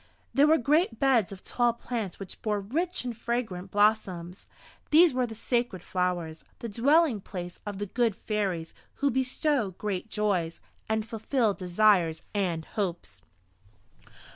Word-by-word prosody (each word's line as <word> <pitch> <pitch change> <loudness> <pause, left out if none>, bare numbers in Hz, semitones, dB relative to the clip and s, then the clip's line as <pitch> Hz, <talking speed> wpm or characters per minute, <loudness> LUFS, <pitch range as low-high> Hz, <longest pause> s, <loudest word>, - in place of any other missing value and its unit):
There 280 +4 +5
were 320 +1 +6
great 290 -1 +2
beds 255 -8 +3
of 190 -1 -10
tall 240 -1 +1
plants 230 -5 -4
which 195 -2 -9
bore 210 -2 0
rich 315 - -2
and 240 -2 -3
fragrant 220 -5 -3
blossoms. 195 -4 +1 0.4
These 320 0 +7
were 255 -1 +1
the 225 - -8
Sacred 235 -5 -1
Flowers, 175 -3 -2
the 235 - -6
dwelling 260 +2 +3
place 180 -2 -7
of 205 -1 -4
the 205 - -3
Good 230 +1 0
Fairies, 190 -7 -2 0.2
who 280 -1 +1
bestow 255 - 0
great 205 0 -3
joys, 195 -7 0 0.3
and 220 0 0
fulfill 225 0 0
desires 180 -3 +2
and 175 -6 -1
hopes. 175 - -4
215 Hz, 140 wpm, -28 LUFS, 185-245 Hz, 0.4 s, These